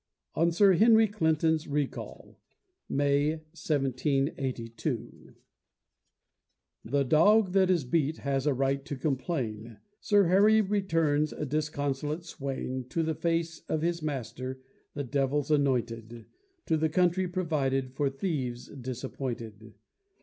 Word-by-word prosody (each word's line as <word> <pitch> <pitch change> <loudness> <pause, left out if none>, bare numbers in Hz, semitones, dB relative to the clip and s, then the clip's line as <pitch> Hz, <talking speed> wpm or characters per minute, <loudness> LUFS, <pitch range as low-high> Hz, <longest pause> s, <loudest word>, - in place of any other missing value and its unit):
ON 170 +1 +2
SIR 195 +3 +5
HENRY 220 +4 +6
CLINTON'S 160 -5 +1
RECALL 145 -1 -4 0.5
[May, 145 +2 +2 0.2
1782] 135 -5 -2 1.5
The 140 +4 +1
dog 185 - +4
that 190 -1 +3
is 175 -5 +2
beat 150 +4 0
has 140 0 -1
a 145 - +3
right 135 +1 0
to 145 - -5
complain 125 -6 -3 0.2
Sir 205 -1 +4
Harry 200 +5 +5
returns, 165 -8 +1
a - - -4
disconsolate 150 +1 -2
swain, 135 -4 -4
To 165 - 0
the 160 0 0
face 165 +1 -1
of 155 0 -1
his 170 0 0
master, 130 -2 -5 0.3
the 145 - -2
devil's 140 +2 0
anointed, 120 -5 0 0.4
To 160 - +1
the 160 0 +1
country 180 +3 +2
provided 140 -8 -1
for 140 0 0
thieves 135 -5 -3
disappointed. 120 -4 -6
145 Hz, 115 wpm, -29 LUFS, 130-165 Hz, 1.5 s, HENRY